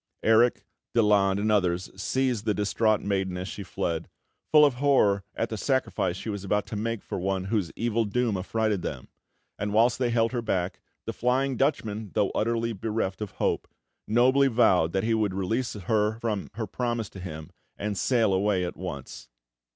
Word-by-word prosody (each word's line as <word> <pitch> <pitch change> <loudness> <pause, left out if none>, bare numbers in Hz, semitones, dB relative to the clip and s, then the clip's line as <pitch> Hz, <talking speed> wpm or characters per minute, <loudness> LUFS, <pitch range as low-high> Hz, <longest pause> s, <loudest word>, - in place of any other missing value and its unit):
Erik, 115 +2 +4 0.3
Daland, 100 -3 +4
and 110 +1 +1
others 90 -3 +1
seized 120 +2 -1
the 105 -2 +1
distraught 110 +1 +1
maiden 95 -2 -1
as 90 +1 -4
she 105 - -6
fled, 85 -2 -3 0.4
full 150 -1 +8
of 140 - +3
horror 105 -9 +3
at 115 - -1
the 110 - -4
sacrifice 115 -8 0
she - - -8
was 100 -2 -4
about 105 +1 0
to - - -7
make 115 +1 -2
for - - -4
one 95 0 -1
whose 95 -3 -1
evil 115 0 0
doom 115 +1 0
affrighted 105 +1 -1
them; - - -6 0.5
and 105 0 -2
whilst 115 +3 +3
they 125 -2 +1
held 115 -1 +2
her 120 -2 -1
back, 90 -5 -2 0.3
the - - -3
Flying 130 +2 +1
Dutchman, 110 -6 -1
though 100 - +2
utterly 115 +1 0
bereft 105 -1 -2
of 105 - -5
hope, - - -1 0.4
nobly 130 +5 +4
vowed 105 -10 +3
that 95 - 0
he 115 +1 +1
would 105 -4 0
release 110 +7 -1
her 105 +2 0
from 110 -4 -2
her 110 0 -2
promise 120 +1 -2
to 95 - -10
him, 80 -4 -7 0.3
and 105 0 -3
sail 110 0 +2
away 95 -1 +1
at 90 - -5
once. 85 -11 -7
105 Hz, 180 wpm, -27 LUFS, 95-115 Hz, 0.5 s, full